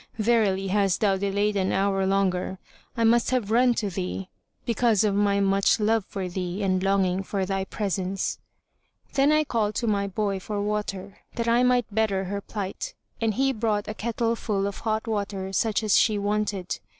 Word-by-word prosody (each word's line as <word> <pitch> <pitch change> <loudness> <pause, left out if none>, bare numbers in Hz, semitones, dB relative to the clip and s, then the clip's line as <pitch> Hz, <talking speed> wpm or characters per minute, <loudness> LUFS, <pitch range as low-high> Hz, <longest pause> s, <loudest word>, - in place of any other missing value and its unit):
Verily, 210 -4 +2
hadst 195 -2 +1
thou 200 -3 +3
delayed 200 +2 0
an 190 -1 +1
hour 195 0 +1
longer, 190 -1 0 0.4
I 230 - +1
must 235 +1 +4
have 245 -5 0
run 245 +1 +4
to 205 -3 -2
thee, 185 +1 -4 0.4
because 230 -2 +2
of 210 -2 +2
my 200 0 +2
much 195 +2 +3
love 220 -1 +2
for 195 -3 -4
thee 180 +2 -3
and 185 -1 +1
longing 195 -1 +1
for 195 0 -2
thy 195 0 -2
presence." 195 -1 -2 0.7
Then 275 +2 +4
I 305 0 +4
called 220 -7 -1
to 240 - -1
my 200 -2 +1
boy 200 0 -1
for 205 +2 -4
water, 205 -2 -3 0.2
that 235 -1 -2
I 235 +1 +4
might 250 -1 +3
better 205 -3 +1
her 200 +2 -4
plight, 200 -2 -5 0.3
and 220 -2 +1
he 270 +1 +2
brought 215 -3 -1
a 215 - -3
kettle 230 +1 -1
full 200 -3 -1
of 200 - -4
hot 220 -1 -1
water 200 -3 -3
such 220 +2 +1
as 215 - +3
she 215 -3 +3
wanted. 205 -2 -1
205 Hz, 185 wpm, -25 LUFS, 195-220 Hz, 0.7 s, must